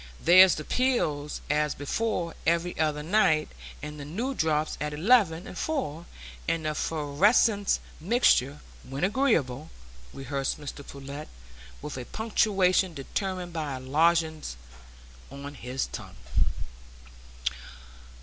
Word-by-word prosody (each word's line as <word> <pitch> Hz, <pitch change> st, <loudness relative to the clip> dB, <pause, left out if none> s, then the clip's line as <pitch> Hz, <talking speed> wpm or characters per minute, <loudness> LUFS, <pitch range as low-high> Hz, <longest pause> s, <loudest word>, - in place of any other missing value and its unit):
"There's 185 Hz, +2 st, +7 dB
the 155 Hz, -, -5 dB
'pills 150 Hz, -, 0 dB
as 150 Hz, 0 st, +1 dB
before' 170 Hz, +3 st, -2 dB
every 170 Hz, +1 st, +1 dB
other 150 Hz, -2 st, 0 dB
night, 165 Hz, -4 st, +3 dB, 0.3 s
and 150 Hz, 0 st, -6 dB
the -, -, -6 dB
new 220 Hz, -, -3 dB
drops 155 Hz, -, 0 dB
at 150 Hz, 0 st, -2 dB
eleven 180 Hz, -2 st, +3 dB
and -, -, -9 dB
four, 175 Hz, -, -3 dB, 0.4 s
and 165 Hz, -1 st, 0 dB
the -, -, +1 dB
'fervescing 190 Hz, -, +2 dB, 0.3 s
mixture 155 Hz, -, +3 dB, 0.2 s
'when 135 Hz, +4 st, -5 dB
agreeable,'" 165 Hz, -, +1 dB, 0.4 s
rehearsed 135 Hz, +1 st, -3 dB
Mr 145 Hz, -1 st, -7 dB
Pullet, 140 Hz, +2 st, -8 dB, 0.6 s
with 150 Hz, -, -5 dB
a 125 Hz, -, -6 dB
punctuation 190 Hz, -, +2 dB
determined 180 Hz, +5 st, -4 dB
by 150 Hz, -4 st, -3 dB
a -, -, -6 dB
lozenge 160 Hz, -, +1 dB, 0.7 s
on 140 Hz, +1 st, -8 dB
his 130 Hz, -1 st, -3 dB
tongue. -, -, -9 dB
160 Hz, 115 wpm, -27 LUFS, 145-190 Hz, 0.7 s, There's